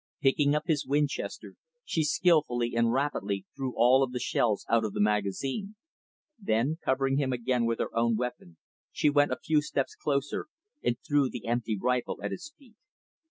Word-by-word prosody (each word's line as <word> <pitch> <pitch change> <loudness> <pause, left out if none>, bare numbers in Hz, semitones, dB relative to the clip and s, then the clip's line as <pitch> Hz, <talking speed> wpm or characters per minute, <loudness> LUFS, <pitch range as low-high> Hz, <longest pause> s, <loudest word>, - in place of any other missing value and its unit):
Picking 145 +1 +3
up 150 - 0
his 155 -4 +1
Winchester, 145 0 -2 0.3
she 160 - 0
skillfully 150 -7 +2
and 115 0 +3
rapidly 105 -8 -1
threw 130 -2 -4
all 125 +3 +5
of 130 -2 0
the 125 - -2
shells 110 -3 0
out 115 0 +3
of 105 -2 -3
the - - -4
magazine. 105 - -1 0.6
Then, 150 - 0
covering 135 +1 +1
him 135 -2 0
again 120 -1 0
with 115 0 0
her - - -3
own 115 0 +2
weapon, 120 -8 -5 0.3
she 150 - +2
went 145 0 +3
a - - -1
few 155 -1 +1
steps 140 -2 -2
closer 140 -1 -2 0.4
and 120 - +1
threw 145 -4 +3
the 120 - -7
empty 115 -2 -1
rifle 125 0 -1
at 105 - -2
his 300 - -7
feet. 240 -6 -21
130 Hz, 175 wpm, -29 LUFS, 115-145 Hz, 0.6 s, all